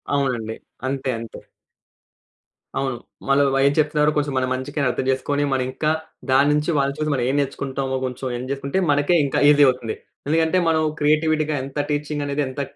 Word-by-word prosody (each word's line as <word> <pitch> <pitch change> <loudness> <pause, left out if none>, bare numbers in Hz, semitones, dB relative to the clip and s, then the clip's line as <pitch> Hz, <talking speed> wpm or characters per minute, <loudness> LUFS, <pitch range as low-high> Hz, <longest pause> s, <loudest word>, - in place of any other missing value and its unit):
అవునండి. 120 -5 -1 0.3
అంతే. 135 0 -2
అంతే. 115 -1 -9 1.4
అవును. 135 -2 -1 0.3
మళ్ళా 140 +1 +4
వై 135 - +3 0.2
చెప్తున్నారో 150 0 +2
కోసం 145 -1 0
మన 130 - +2
మంచికే 135 +4 -4
అనర్థం 130 0 0
చేసుకోని, 140 +2 0
మరింకా, 130 +4 0 0.4
దాన్నుంచి 150 +4 +3
వాళ్ళని 140 +1 0
చూసి, 155 -1 0
మనం 125 -3 0
ఏం 140 - 0
నేర్చుకుంటామో 135 -1 -2
కొంచెం 130 +1 -5
ఎన్ 125 +1 -6
జేసుకుంటే, 140 +6 -1
మనకే 145 +4 +3
ఇంకా 135 - 0
ఈజీ 145 0 +6
అవుతుంది. 125 -3 -1 0.3
ఎందుకంటే, 160 +3 +2
మనం 160 -1 +2 0.2
క్రియేటివిటీ‌గా, 155 0 +2
ఎంత 140 +2 -6
టీచింగనేది 145 -1 -1
ఎంత 130 +2 -4
140 Hz, 150 wpm, -22 LUFS, 130-150 Hz, 1.4 s, ఈజీ